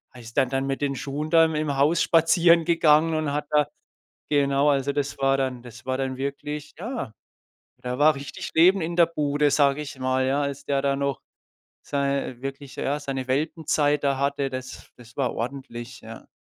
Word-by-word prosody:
ist 115 -1 -12
dann 130 - +3
dann 135 +1 -1
mit 135 +1 -2
den 140 -1 0
Schuhen 145 +4 -4
da 165 -1 +6
im 155 -3 -1
Haus 150 +5 +3
spazieren 170 +1 +4
gegangen 160 -1 +4
und 155 -2 -1
hat 150 0 -2
da 150 -1 +4 0.6
genau, 140 0 +3
also 140 -1 +1
das 145 -1 -2
war 135 0 +3
dann 130 -2 -2
das 125 +1 -12
war 130 - 0
dann 130 -1 -3
wirklich 145 +2 -5
ja, 225 - -5 0.7
da 125 +1 -4
war 155 +1 +5
richtig 140 -1 -7
lebend 180 +3 +5
in 170 +1 -4
der 170 - +7
Bude, 145 -2 0
sage 145 0 +3
ich 145 -2 -9
mal, 130 0 0
ja, 140 +2 +1
als 140 0 -4
der 140 -1 0
da 140 0 +1
noch 140 -1 -2 0.6
sei 140 -2 -1
wirklich 135 0 -7
ja, 145 +2 -1
seine 135 -3 -4
Welpenzeit 150 +1 0
da 140 -1 +1
hatte, 140 0 0
das 130 0 -8
das 120 -1 -16
war 135 -3 0
ordentlich, 120 -1 -6
ja. 115 +1 -11
140 Hz, 185 wpm, -25 LUFS, 135-150 Hz, 0.7 s, der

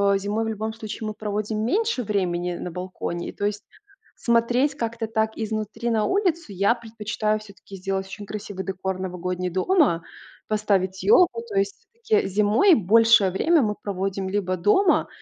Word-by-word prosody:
э, - - +3
зимой 205 +3 -1
в - - -2
любом 220 0 -3
случае 220 0 -6
мы 215 - -4
проводим 215 +1 -2
меньше 425 - 0
времени 180 -4 -1
на 180 - -5
балконе, 180 -1 -5
и, - - -6
то 205 - -4
есть, 205 0 -2 0.5
смотреть 245 +4 +2
как-то 230 -3 -3
так 220 0 0
изнутри 220 +1 -3
на 220 -2 +1
улицу. 345 - 0
Я 200 +5 +3
предпочитаю 220 -2 -2
всё-таки 200 -2 -13
сделать 190 +1 -2
очень 205 +1 -8
красивый 205 -2 -6
декор 190 0 -3
в - - -7
новогодний 180 0 -3
дома, 185 - +2 0.4
поставить 195 -3 0
ёлку. 360 - +5
То 410 - -6
есть 410 +3 -1 0.2
я 430 -1 +4
зимой 210 - +4
большее 220 -1 +5
время 320 - +3
мы 210 -1 0
проводим 195 -1 -3
либо 190 -2 -1
дома, 310 - +3
210 Hz, 165 wpm, -24 LUFS, 190-230 Hz, 0.5 s, ёлку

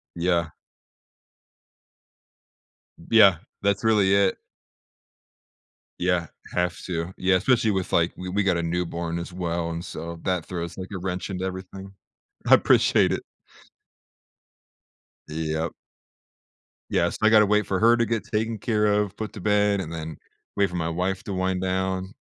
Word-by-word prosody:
Yeah. 85 -2 +1 2.6
Yeah, 100 -6 +7 0.2
that's 100 +1 +1
really 105 -3 +4
it. 100 -1 +2 1.6
Yeah. 90 -2 +1 0.3
Have 90 -1 0
to. 85 0 -3
Yeah, 95 0 +2
especially 110 +2 +2
with, 95 -2 -2
like 85 0 +3
we 90 0 -6
we 100 +2 0
got 90 -3 +2
a 85 - -2
newborn 85 0 -2
as 85 +1 -6
well 85 -2 -2
and, 85 +1 -4
so, 85 +1 -7
that 90 -3 -1
throws 85 -1 -5
like 95 0 -6
a - - -4
wrench 90 +1 -4
into 95 0 -3
everything. 95 +1 -7 0.6
I - - +7
appreciate - - +3
it. - - -1 2.1
Yep. 80 +1 -2 1.2
Yes. - - +1
I 110 - +5
gotta 105 -1 +6
wait 105 0 +2
for 95 - -1
her 115 +2 +5
to 115 - +2
get 115 -1 -1
taken 110 +1 -2
care 105 0 0
of, 105 -2 +1
put 110 -1 -5
to 100 - -8
bed, 105 -1 +2
and 80 -2 -6
then 80 -1 -6 0.4
wait 100 -2 +2
for 90 - -7
my 80 -1 -1
wife 90 +3 -2
to 100 - -5
wind 95 0 -1
down. 95 +1 -2
95 Hz, 150 wpm, -25 LUFS, 85-100 Hz, 2.6 s, Yeah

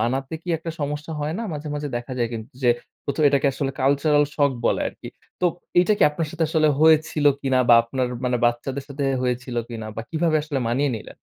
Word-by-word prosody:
মানাতে 130 +5 -1
কি 180 - -12
একটা 165 +1 -5
সমস্যা 150 +2 -3
হয় 150 +2 -2
না? 230 - -3
মাঝে, 150 0 -5
মাঝে 145 0 -3
দেখা 120 +2 -6
যায় 120 -1 +1
কিন্তু 110 +1 -6
যে 120 - +5 0.3
প্রথ 140 - -3
এটাকে 140 0 +2
আসলে 135 0 -2
কালচারাল 145 +2 +3
শক 145 -2 +3 0.2
বলে - - +1
আরকি। - - -11 0.3
তো 180 - +3 0.3
এইটা 180 +4 +4
কি - - +3
আপনার 160 +2 -3
সাথে 170 0 -1
আসলে 155 0 +3
হয়েছিল 155 -1 +4 0.2
কিনা 135 -2 +1
বা 120 - +9
আপনার 125 +2 -2 0.2
মানে 125 0 +1
বাচ্চাদের 130 +3 -1
সাথে 140 0 -3 0.2
হয়েছিল 125 0 -2
কিনা 115 -2 -6
বা 115 - -3
কিভাবে 160 -1 +1
আসলে 150 -3 -3
মানিয়ে 135 +4 +1
নিলেন? 110 - -11
140 Hz, 205 wpm, -23 LUFS, 125-155 Hz, 0.3 s, বা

